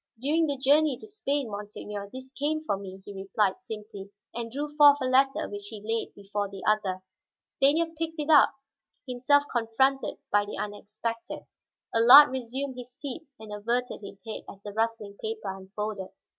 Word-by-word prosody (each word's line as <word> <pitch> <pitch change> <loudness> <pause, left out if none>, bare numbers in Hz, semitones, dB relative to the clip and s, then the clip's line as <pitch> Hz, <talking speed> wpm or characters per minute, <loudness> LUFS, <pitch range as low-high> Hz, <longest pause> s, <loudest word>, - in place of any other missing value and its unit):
"During 310 +6 +2
the 285 -1 -1
journey 285 +1 +4
to - - -12
Spain, 285 - -2
monseigneur, 205 0 -6
this 260 0 -9
came 305 +3 -1
for 255 - 0
me," 190 -1 -9
he 205 - -8
replied 195 0 0
simply, 210 -4 -8 0.2
and 235 0 -4
drew 285 +5 -3
forth 290 -1 +8
a 260 - -1
letter 265 +1 +3
which 205 0 -7
he 215 0 -7
laid 225 +2 -3
before 205 0 -3
the 195 -1 -9
other. 190 -3 +1 0.4
Stanief 315 +5 +2
picked 325 -1 -3
it 300 +1 0
up, 295 - +7 0.6
himself 260 +3 +3
confronted 260 +4 +1
by 205 0 +4
the 205 - -6
unexpected. 215 +2 -5 0.5
Allard 250 +5 +9
resumed 260 +1 -3
his 250 0 -9
seat 285 +3 -7
and 215 -1 -8
averted 235 +4 -2
his 200 -1 -11
head 220 - -5
as 195 - -11
the 205 - -7
rustling 220 -2 -2
paper 220 -3 -4
unfolded. 195 +1 -5
230 Hz, 170 wpm, -28 LUFS, 205-275 Hz, 0.6 s, Allard